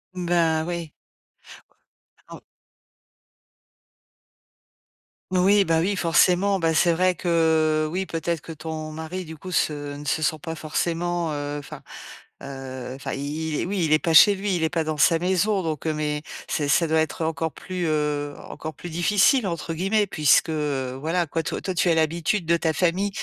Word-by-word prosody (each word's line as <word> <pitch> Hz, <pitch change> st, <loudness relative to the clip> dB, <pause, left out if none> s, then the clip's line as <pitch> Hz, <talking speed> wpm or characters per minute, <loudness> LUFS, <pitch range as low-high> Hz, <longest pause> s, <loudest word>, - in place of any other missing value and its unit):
Mmh, 180 Hz, -1 st, -4 dB
ben, 165 Hz, -2 st, +2 dB
oui. 170 Hz, -3 st, -4 dB, 1.4 s
En -, -, -9 dB, 2.9 s
Oui, 195 Hz, +2 st, +4 dB
bah 165 Hz, -2 st, +1 dB
oui, 195 Hz, +4 st, 0 dB
forcément, 180 Hz, +3 st, +3 dB
bah 165 Hz, -3 st, +1 dB
c'est 170 Hz, +2 st, +4 dB
vrai 180 Hz, +2 st, +2 dB
que, 160 Hz, -3 st, +2 dB
oui, 190 Hz, +2 st, -2 dB
peut-être 165 Hz, -1 st, -2 dB
que 165 Hz, -, -9 dB
ton 155 Hz, 0 st, -6 dB
mari, 160 Hz, +4 st, -6 dB
du 160 Hz, 0 st, -9 dB
coup 185 Hz, +4 st, -9 dB
se 145 Hz, -4 st, -1 dB
ne 145 Hz, -, -9 dB
se 150 Hz, +2 st, -1 dB
sent 155 Hz, +1 st, 0 dB
pas 165 Hz, 0 st, -5 dB
forcément, 170 Hz, +1 st, -2 dB
heu, 145 Hz, 0 st, -4 dB
enfin, 145 Hz, 0 st, -10 dB, 0.6 s
heu, 130 Hz, -2 st, -7 dB
enfin 135 Hz, -, -5 dB
i 150 Hz, +3 st, -4 dB
il 150 Hz, -, -2 dB
est, -, -, -2 dB
oui, 185 Hz, -2 st, -1 dB
il 150 Hz, -, -1 dB
est 155 Hz, -, +6 dB
pas 165 Hz, +1 st, -1 dB
chez 200 Hz, +6 st, +8 dB
lui, 195 Hz, -1 st, -1 dB
il 165 Hz, -, -1 dB
est 160 Hz, -, +2 dB
pas 165 Hz, -1 st, -1 dB
dans 155 Hz, -1 st, -3 dB
sa 165 Hz, +3 st, +5 dB
maison. 190 Hz, +3 st, +1 dB
Donc, 160 Hz, -1 st, -3 dB
heu, 155 Hz, -, 0 dB
mais 150 Hz, -1 st, -2 dB, 0.3 s
c'est 145 Hz, -2 st, -1 dB
ça 165 Hz, +4 st, +3 dB
doit 160 Hz, 0 st, +2 dB
être 160 Hz, +1 st, -1 dB
encore 160 Hz, 0 st, -2 dB
plus, 180 Hz, -2 st, -4 dB
heu, 150 Hz, -1 st, -1 dB, 0.2 s
encore 155 Hz, -1 st, -7 dB
plus 175 Hz, -, -9 dB
«difficile» 200 Hz, -, +3 dB
entre 170 Hz, -1 st, -4 dB
guillemets 200 Hz, +5 st, +1 dB
puisque, 155 Hz, -2 st, +3 dB
heu, 140 Hz, -4 st, -2 dB
voilà 170 Hz, +4 st, 0 dB
quoi, 165 Hz, +1 st, -2 dB
toi 160 Hz, -, -4 dB
toi 185 Hz, -, -3 dB
tu 175 Hz, 0 st, +1 dB
as 165 Hz, -, +3 dB
l'habitude 165 Hz, +4 st, 0 dB
de 170 Hz, +1 st, +3 dB
ta 165 Hz, -1 st, 0 dB
famille. 180 Hz, +4 st, +1 dB
160 Hz, 185 wpm, -24 LUFS, 155-175 Hz, 2.9 s, chez